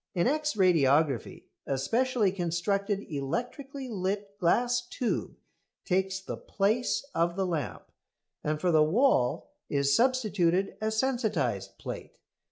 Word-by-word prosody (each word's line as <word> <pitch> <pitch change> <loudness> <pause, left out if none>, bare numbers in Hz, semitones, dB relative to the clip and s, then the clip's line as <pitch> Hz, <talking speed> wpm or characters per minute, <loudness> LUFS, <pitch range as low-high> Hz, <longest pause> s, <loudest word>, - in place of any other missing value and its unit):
In 175 - +2
X 300 +2 +1
radiography 155 - +2 0.2
a 135 - 0
specially 230 - +1
constructed 195 +3 -1
electrically 245 - -4
lit 200 -1 -3
glass 240 +7 +2
tube 240 0 -3 0.5
takes 190 0 0
the 190 - -6
place 220 +7 0
of 170 +1 +1
the 190 0 0
lamp, 145 - -3 0.6
and 150 0 -1
for 180 +2 +1
the 155 -1 +5
wall 155 - +2 0.2
is 140 -1 +2
substituted 205 -8 +2
a 215 - +1
sensitised 220 - -1
plate. - - -7
190 Hz, 120 wpm, -29 LUFS, 160-240 Hz, 0.6 s, the